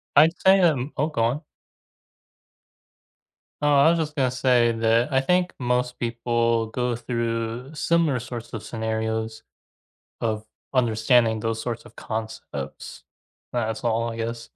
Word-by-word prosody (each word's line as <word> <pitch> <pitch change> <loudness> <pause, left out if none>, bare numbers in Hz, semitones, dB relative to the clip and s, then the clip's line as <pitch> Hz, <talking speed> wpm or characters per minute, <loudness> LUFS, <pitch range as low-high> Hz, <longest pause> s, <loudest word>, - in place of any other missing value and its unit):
I'd 160 +4 +6
say, 190 +1 +6
um 150 -5 +2
Oh, 150 +3 +2
go 140 -8 -1
on. 125 +6 0 2.2
Oh, 145 - +3
I 140 +3 +6
was 170 - +3
just 150 -2 -2
gonna 130 -4 +1
say 125 -2 +3
that 115 +4 +2
I 135 - +4
think 180 +4 +1
most 125 0 0
people 115 -1 0
go 125 +2 -1
through 115 +2 -3
similar 160 -4 +2
sorts 120 -1 -7
of 110 - -5
scenarios 110 0 -3 0.8
of 110 -1 -2 0.3
understanding 115 -2 +3
those 115 0 -2
sorts 120 -1 -4
of - - -15
concepts. 110 0 -6 0.5
That's 110 -1 -2
all, 115 0 +1
I 115 - -6
guess. 115 0 -4
120 Hz, 135 wpm, -24 LUFS, 115-130 Hz, 2.2 s, I'd